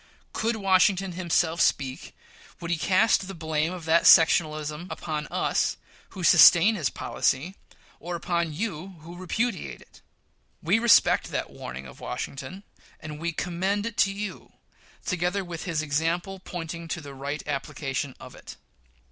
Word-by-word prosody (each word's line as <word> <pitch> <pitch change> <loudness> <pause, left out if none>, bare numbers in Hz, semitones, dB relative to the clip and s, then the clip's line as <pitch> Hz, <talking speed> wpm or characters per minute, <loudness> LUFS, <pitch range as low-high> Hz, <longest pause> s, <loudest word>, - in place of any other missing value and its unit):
Could 225 +1 0
Washington 195 -1 +2
himself 170 -1 0
speak, 130 -2 -1 0.4
would 170 0 -5
he 170 - +1
cast 190 +3 +3
the 195 - -7
blame 160 0 -1
of 180 -3 -7
that 165 +1 +4
sectionalism 155 0 +4
upon 150 -3 -4
us, - - 0 0.4
who 185 - -5
sustain 175 +5 +7
his 170 -10 -1
policy, 155 +9 -1 0.5
or 175 +1 -5
upon 170 -1 -1
you, 185 +1 -5
who 170 +3 -11
repudiate 190 +4 -3
it? - - -20 0.6
We 190 +8 +2
respect 235 -1 +5
that - - -3
warning 65 +2 -8
of 65 - -13
Washington, 185 +8 -6 0.4
and 150 -1 -8
we 170 +1 -2
commend 190 +5 -2
it 230 -2 -4
to 195 - +3
you, 200 0 -7 0.5
together 180 +2 -1
with 170 -2 -7
his 160 -3 -1
example 165 +6 -1
pointing 170 -2 -7
to 170 - -3
the 140 -2 -10
right 140 +2 -5
application 135 -1 -3
of - - -11
it. - - -11
170 Hz, 150 wpm, -26 LUFS, 155-190 Hz, 0.6 s, sustain